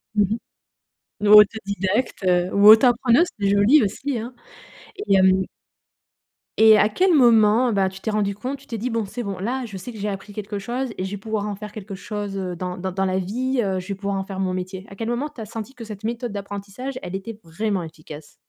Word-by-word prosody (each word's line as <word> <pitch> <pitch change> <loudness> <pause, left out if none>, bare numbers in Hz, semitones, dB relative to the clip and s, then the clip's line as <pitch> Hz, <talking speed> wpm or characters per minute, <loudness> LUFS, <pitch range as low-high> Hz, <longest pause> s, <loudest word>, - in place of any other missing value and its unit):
Mmh 210 - +4
mh. - - -2 0.9
Ou 205 - +7
autodidacte, 200 +1 -2
heu, 180 -1 +2
ou 200 +1 +5
auto 220 +4 +9
appreneuse, 245 +6 +3
c'est 200 -1 +1
joli, 205 +9 +5
aussi, 255 +6 -2
hein. 235 +3 -6 0.6
Et 390 - 0
hem 190 0 +4 1.1
et 220 -1 +7
à 210 - +4
quel 360 - +2
moment, 235 -3 +5
bah, 195 -2 +2
tu 190 0 -11
t'es 220 - -3
rendue 205 -1 0
compte, 255 +7 -5
tu 280 - -19
t'es 230 - -5
dit: 240 +4 -3
«Bon, 230 -1 -1
c'est 240 +5 -6
bon, 200 -3 -4
là, 250 +6 -2
je 210 -4 -9
sais 190 +6 -7
que 225 - -11
j'ai 210 0 -3
appris 200 0 -6
quelque 210 0 -5
chose 245 +6 -3
et - - -3
je 190 - -4
vais 205 - -4
pouvoir 210 0 -3
en 205 - -3
faire 210 +1 -9
quelque 205 -2 -8
chose, 205 0 -5
heu, 185 -2 -4
dans 180 +1 -5
dans 190 +1 -4
dans 190 +1 0
la 185 0 0
vie, 250 +7 -1
heu, 190 -3 -1
je 185 +2 -10
vais 200 - -2
pouvoir 200 +1 -3
en 195 - -2
faire 190 0 -7
mon 185 -1 -1
métier»? 185 +1 -5
À 195 - -11
quel 225 +3 -4
moment, 240 +5 -1
tu 245 - -11
as - - -5
senti 225 +4 -7
que 245 - -9
cette 215 -2 -8
méthode 235 +1 -3
d'apprentissage, 200 +6 -6
elle 180 - -6
était 205 +3 -6
vraiment 190 +3 -2
efficace? 155 -2 -11
205 Hz, 235 wpm, -22 LUFS, 190-230 Hz, 1.1 s, auto